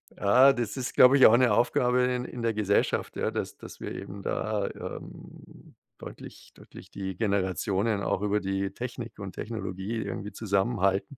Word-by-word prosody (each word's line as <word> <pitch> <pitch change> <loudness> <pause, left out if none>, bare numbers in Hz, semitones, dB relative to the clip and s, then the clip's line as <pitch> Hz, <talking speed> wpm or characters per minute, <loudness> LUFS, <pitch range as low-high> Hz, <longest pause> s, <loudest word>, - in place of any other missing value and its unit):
ah, 125 +7 +5
das 120 -1 -3
ist, 130 - -4
glaube 130 +2 +7
ich, 135 - +7
auch 110 - +8
'ne 125 -3 +4
Aufgabe 125 +2 +2
in 125 0 0
in 125 -1 -7
der 115 -1 0
Gesellschaft, 100 -1 0
ja, - - 0
dass - - -4
dass - - -12
wir - - -5
eben 100 0 -8
da, 105 -2 -2
ähm, - - -11 0.2
deutlich - - -11
deutlich - - -15
die 95 -2 -5
Generationen 100 0 0
auch 95 - -1
über 105 0 +1
die 95 0 -2
Technik 120 +1 -7
und 100 -2 -7
Technologie 105 -1 -5
irgendwie 105 0 -5
zusammenhalten 100 +3 0
105 Hz, 165 wpm, -27 LUFS, 100-120 Hz, 0.2 s, auch